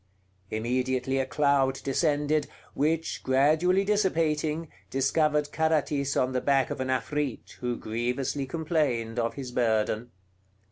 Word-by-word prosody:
Immediately 130 Hz, +3 st, -1 dB
a 130 Hz, -, -1 dB
cloud 135 Hz, +1 st, +2 dB
descended, 145 Hz, +1 st, +1 dB, 0.3 s
which, 160 Hz, +3 st, 0 dB
gradually 155 Hz, +8 st, +3 dB
dissipating, 165 Hz, -6 st, +1 dB, 0.2 s
discovered 150 Hz, +2 st, +1 dB
Carathis 150 Hz, -3 st, +1 dB
on 130 Hz, 0 st, +2 dB
the 125 Hz, -, 0 dB
back 135 Hz, -2 st, +2 dB
of -, -, -3 dB
an 130 Hz, -, -2 dB
Afrit, 130 Hz, +1 st, -2 dB
who 125 Hz, -1 st, -2 dB
grievously 125 Hz, +5 st, -2 dB
complained 135 Hz, -7 st, -1 dB
of 115 Hz, 0 st, -1 dB
his 130 Hz, -3 st, -6 dB
burden. 110 Hz, -1 st, 0 dB
140 Hz, 120 wpm, -27 LUFS, 125-155 Hz, 0.3 s, gradually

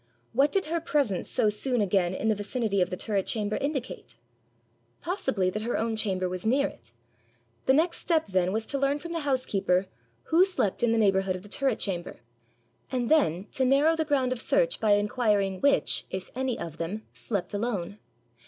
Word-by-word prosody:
What 275 Hz, +5 st, +3 dB
did 390 Hz, -2 st, 0 dB
her 330 Hz, +2 st, -1 dB
presence 275 Hz, -, 0 dB
so 215 Hz, -, +2 dB
soon 245 Hz, +4 st, -1 dB
again 185 Hz, -3 st, +1 dB
in 220 Hz, -, -2 dB
the 220 Hz, -, +4 dB
vicinity 205 Hz, -1 st, -1 dB
of 180 Hz, -, +2 dB
the 180 Hz, -, -4 dB
turret 200 Hz, -2 st, -1 dB
chamber 210 Hz, -2 st, -1 dB
indicate? 270 Hz, -, -4 dB, 0.9 s
Possibly 265 Hz, -, 0 dB
that 215 Hz, -, -3 dB
her 235 Hz, +2 st, -1 dB
own 225 Hz, 0 st, -1 dB
chamber 190 Hz, -4 st, 0 dB
was 180 Hz, 0 st, -5 dB
near 265 Hz, +6 st, +3 dB
it. 115 Hz, -2 st, -14 dB, 0.8 s
The 265 Hz, -, +6 dB
next 335 Hz, +4 st, +2 dB
step 325 Hz, -3 st, +1 dB
then 185 Hz, -2 st, +1 dB
was 220 Hz, +2 st, -2 dB
to 280 Hz, -, -2 dB
learn 275 Hz, +1 st, +2 dB
from 335 Hz, +3 st, -8 dB
the 335 Hz, -, -1 dB
housekeeper 235 Hz, -, +1 dB, 0.4 s
who 335 Hz, +3 st, +4 dB
slept 370 Hz, -, 0 dB
in 240 Hz, -1 st, +3 dB
the 230 Hz, -, +2 dB
neighbourhood 195 Hz, -3 st, +2 dB
of 185 Hz, -, -8 dB
the 205 Hz, -, -13 dB
turret 265 Hz, 0 st, 0 dB
chamber, 175 Hz, -, -4 dB, 0.7 s
and 250 Hz, -3 st, -1 dB
then 195 Hz, -, +3 dB
to 265 Hz, -, -1 dB
narrow 280 Hz, +5 st, +4 dB
the 320 Hz, -, 0 dB
ground 275 Hz, -4 st, +1 dB
of 250 Hz, -2 st, -2 dB
search -, -, +2 dB
by 215 Hz, -2 st, +4 dB
inquiring 205 Hz, -2 st, +1 dB
which, 280 Hz, 0 st, +2 dB
if 185 Hz, -1 st, -6 dB
any 260 Hz, -1 st, -1 dB
of 165 Hz, -2 st, -7 dB
them, 195 Hz, +6 st, -4 dB
slept 195 Hz, -5 st, -4 dB
alone. 205 Hz, -3 st, -3 dB
220 Hz, 190 wpm, -27 LUFS, 195-275 Hz, 0.9 s, The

